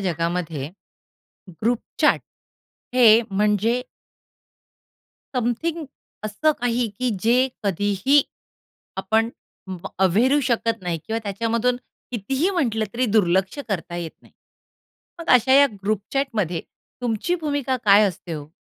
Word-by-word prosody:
जगामध्ये 165 -5 -2 0.9
ग्रुपचॅट 235 +1 +1 0.7
हे 230 -3 +7
म्हणजे 210 +4 +1 1.5
समथिंग 305 +8 -1 0.4
असं 260 +9 +1
काही, 245 0 +1
की 245 +5 -2
जे 250 +3 +3 0.2
कधीही 205 - +2 0.7
आपण 220 +4 +1 0.4
व 190 0 -6 0.2
अव्हेरू 240 +11 +3
शकत 230 -2 0
नाही 175 -2 -2
किंवा 225 0 -1
त्याच्यामधून 230 +4 0 0.4
कितीही 265 - 0
म्हंटलं 240 - 0
तरी 255 +1 +1
दुर्लक्ष 190 +3 +2
करता 175 -3 -3
येत 170 -2 -4
नाही. - - -21 0.9
मग 335 - -8
अशा 250 +2 +4
या 280 +1 +7 0.2
ग्रुपचॅटमध्ये 210 - -1 0.4
तुमची 240 +8 0
भूमिका 285 -4 -1
काय 205 0 +7
असते 175 -1 -8
हो? 150 -2 -6
220 Hz, 105 wpm, -23 LUFS, 190-250 Hz, 1.5 s, हे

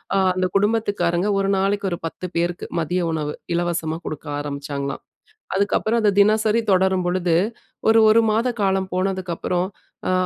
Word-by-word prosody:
அ - - +3 0.2
அந்த 185 0 +1
குடும்பத்துக்காரங்க 205 -4 +1
1 195 0 0
நாளைக்கு 200 0 0
ஒரு - - -2
10 180 - -8
பேருக்கு 175 +1 -1 0.2
மதிய 175 +3 -1
உணவு 150 -2 -2 0.2
இலவசமா 170 -2 -1
குடுக்க 155 - -6
ஆரம்பிச்சாங்களாம். 140 -1 -4 0.5
அதுக்கப்பறம் 215 +3 +1
அது 210 - +4
தினசரி 215 +2 +4
தொடரும் 190 -1 +3
பொழுது, 175 -2 +1 0.5
ஒரு 225 0 +6
1 230 +1 +6
மாத 225 +4 +1
காலம் 190 -1 +1
போனதுக்கு 185 -1 -1
அப்பறம் 180 +2 -1 0.4
அ - - +2
185 Hz, 145 wpm, -22 LUFS, 170-205 Hz, 0.5 s, ஒரு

